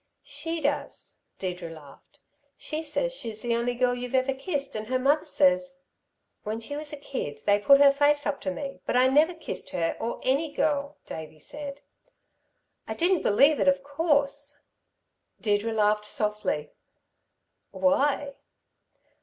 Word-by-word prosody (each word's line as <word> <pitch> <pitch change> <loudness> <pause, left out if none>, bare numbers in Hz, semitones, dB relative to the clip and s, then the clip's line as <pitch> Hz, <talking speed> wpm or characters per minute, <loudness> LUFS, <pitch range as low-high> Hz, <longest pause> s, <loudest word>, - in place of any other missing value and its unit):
"She 295 +4 -3
does." 285 0 -2 0.2
Deirdre 180 -2 -4
laughed. 155 -4 -15 0.4
"She 310 0 -4
says 410 +11 -1
she's 225 - -6
the 235 -1 0
only 240 +1 0
girl 250 0 +2
you've 245 +1 -4
ever 260 +1 +2
kissed. 275 -1 -4
And 215 0 -4
her 255 +2 +1
mother 280 +4 +2
says 275 -1 +2 0.3
" - - -50
"When 215 +1 -3
she 230 +6 -5
was 295 0 -3
a 295 - -5
kid, 145 - -5
they 205 0 +4
put 275 +7 +6
her 280 -1 +8
face 290 +1 +2
up 290 -1 -2
to - - -2
me; 275 +9 -5
but - - 0
I 255 - +6
never 310 +6 +4
kissed 330 - -6
her 165 -1 -1
or 230 - -3
any 280 +4 +1
girl," 290 -1 0
Davey 160 -1 -8
said. 285 - -7 1.1
"I - - -4
didn't 355 +1 +2
believe 280 +9 +4
it, - - +2
of 275 0 +3
course!" 285 -1 0 0.8
Deirdre 210 +1 +1
laughed 210 -1 +2
softly. 210 -9 -1 1.0
"Why?" 280 0 +1
275 Hz, 155 wpm, -27 LUFS, 220-290 Hz, 1.1 s, her